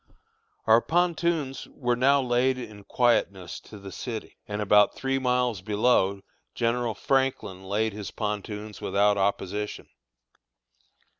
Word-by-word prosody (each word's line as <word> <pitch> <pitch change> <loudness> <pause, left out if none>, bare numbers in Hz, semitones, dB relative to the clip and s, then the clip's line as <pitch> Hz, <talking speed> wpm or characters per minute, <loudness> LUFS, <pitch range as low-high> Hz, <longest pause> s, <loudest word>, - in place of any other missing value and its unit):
Our 110 +1 +6
pontoons 170 -4 0
were 120 -2 -1
now 135 +3 +3
laid 125 +1 +2
in 105 -5 -9
quietness 100 -8 +1
to 105 - -13
the 100 -1 -10
city; 115 0 -6
and 105 0 -4
about 105 0 +4
three 135 0 -1
miles 125 -5 0
below 100 -1 +2 0.3
General 120 -1 0
Franklin 130 -8 -1
laid 105 +3 0
his 105 -1 -6
pontoons 105 0 -5
without 100 +1 +2
opposition. 100 +1 -2
110 Hz, 120 wpm, -26 LUFS, 105-125 Hz, 0.3 s, Our